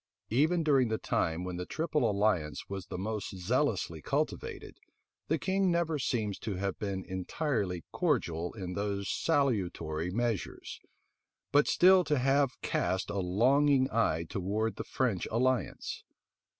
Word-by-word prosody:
Even 160 Hz, +8 st, +3 dB
during 135 Hz, -5 st, +4 dB
the 110 Hz, 0 st, -1 dB
time 85 Hz, -3 st, -1 dB
when 90 Hz, -1 st, -4 dB
the 90 Hz, -, -4 dB
triple 155 Hz, -7 st, 0 dB
alliance 100 Hz, -8 st, 0 dB
was 95 Hz, -2 st, -6 dB
the -, -, -5 dB
most 105 Hz, 0 st, -4 dB
zealously 95 Hz, -, 0 dB
cultivated, -, -, -3 dB, 0.5 s
the 160 Hz, -, +1 dB
king 190 Hz, +3 st, +1 dB
never 170 Hz, -3 st, +1 dB
seems 110 Hz, -6 st, -1 dB
to 105 Hz, -4 st, -4 dB
have 100 Hz, +1 st, -3 dB
been 100 Hz, -2 st, -3 dB
entirely 95 Hz, -, -2 dB
cordial 90 Hz, -, 0 dB
in 95 Hz, -4 st, -5 dB
those 100 Hz, 0 st, -2 dB
salutary 90 Hz, -, 0 dB
measures, 115 Hz, 0 st, -3 dB, 0.7 s
but 145 Hz, +1 st, +4 dB
still 185 Hz, +1 st, +6 dB
to 150 Hz, -1 st, +1 dB
have 135 Hz, +1 st, +2 dB
cast 95 Hz, 0 st, -1 dB
a 100 Hz, -, -2 dB
longing 130 Hz, +9 st, +3 dB
eye 85 Hz, -7 st, +1 dB
towards 105 Hz, +5 st, -2 dB
the -, -, -3 dB
French 115 Hz, -9 st, -1 dB
alliance. 125 Hz, +2 st, -1 dB
110 Hz, 135 wpm, -31 LUFS, 95-140 Hz, 0.7 s, still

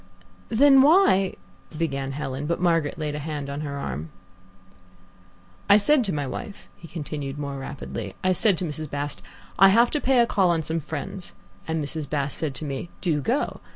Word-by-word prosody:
"Then 270 Hz, +3 st, +6 dB
why 280 Hz, -, +4 dB, 0.2 s
?" 155 Hz, -, -16 dB
began 140 Hz, -4 st, -2 dB
Helen, 135 Hz, 0 st, -4 dB
but 170 Hz, -, -1 dB
Margaret 165 Hz, -3 st, +1 dB
laid 150 Hz, -2 st, -3 dB
a 150 Hz, -, -4 dB
hand 145 Hz, -2 st, -4 dB
on 140 Hz, +2 st, -4 dB
her 140 Hz, -2 st, -4 dB
arm. 75 Hz, -, -5 dB, 1.6 s
"I 200 Hz, -, +9 dB
said 260 Hz, +6 st, +5 dB
to 195 Hz, -, 0 dB
my 145 Hz, -4 st, -2 dB
wife," 200 Hz, +9 st, -7 dB
he 170 Hz, -, -13 dB
continued 145 Hz, -4 st, -5 dB
more 140 Hz, -1 st, -4 dB
rapidly 115 Hz, -7 st, -6 dB
"I 185 Hz, -, +3 dB
said 190 Hz, +1 st, +3 dB
to 180 Hz, -, -2 dB
Mrs. 155 Hz, -1 st, -5 dB
Bast, 145 Hz, -7 st, -4 dB, 0.4 s
'I 195 Hz, -, +9 dB
have 235 Hz, +4 st, +4 dB
to 300 Hz, -, -1 dB
pay 265 Hz, 0 st, +3 dB
a 240 Hz, -, +6 dB
call 195 Hz, -5 st, +2 dB
on 165 Hz, -2 st, +1 dB
some 160 Hz, +2 st, -2 dB
friends,' 160 Hz, +5 st, -5 dB, 0.3 s
and 160 Hz, -2 st, -1 dB
Mrs. 150 Hz, -1 st, -4 dB
Bast 140 Hz, -2 st, -2 dB
said 150 Hz, -4 st, -2 dB
to 155 Hz, -, -5 dB
me, 140 Hz, +4 st, -4 dB
'Do 160 Hz, -6 st, 0 dB
go.' 245 Hz, -, -1 dB
155 Hz, 190 wpm, -25 LUFS, 140-190 Hz, 1.6 s, I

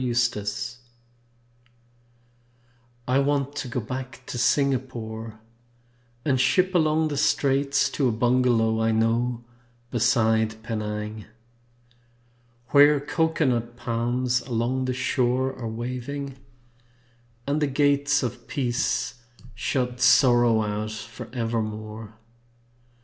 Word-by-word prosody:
PENANG 120 Hz, -4 st, 0 dB, 2.6 s
I 130 Hz, +2 st, +3 dB
want 140 Hz, 0 st, 0 dB
to 135 Hz, -, -3 dB
go 125 Hz, +1 st, -2 dB
back 130 Hz, +2 st, -6 dB
to 125 Hz, -, -5 dB
Singapore 115 Hz, -5 st, -1 dB, 0.9 s
And 130 Hz, -4 st, +2 dB
ship 185 Hz, +6 st, +2 dB
along 155 Hz, -2 st, +2 dB
the 145 Hz, -, -3 dB
Straits, 140 Hz, -1 st, +2 dB
To 140 Hz, -, +1 dB
a -, -, +2 dB
bungalow 120 Hz, -1 st, +2 dB
I 110 Hz, -, +2 dB
know 115 Hz, +2 st, 0 dB, 0.5 s
beside 110 Hz, -2 st, +2 dB
Penang; 105 Hz, -1 st, -4 dB, 1.4 s
Where 145 Hz, 0 st, +6 dB
cocoanut 140 Hz, -6 st, 0 dB
palms 120 Hz, +1 st, -1 dB
along 125 Hz, +2 st, -1 dB
the 130 Hz, -, -1 dB
shore 130 Hz, +1 st, 0 dB
Are 115 Hz, -3 st, -5 dB
waving, 125 Hz, +4 st, -5 dB, 1.1 s
and 145 Hz, +2 st, 0 dB
the 150 Hz, -, +2 dB
gates 145 Hz, +1 st, +2 dB
Of 125 Hz, -1 st, -5 dB
Peace 125 Hz, -2 st, -1 dB, 0.3 s
shut 125 Hz, -2 st, -2 dB
Sorrow 120 Hz, -4 st, +5 dB
out 105 Hz, +1 st, -3 dB
forevermore. 110 Hz, -2 st, -5 dB
125 Hz, 95 wpm, -25 LUFS, 115-135 Hz, 2.6 s, Where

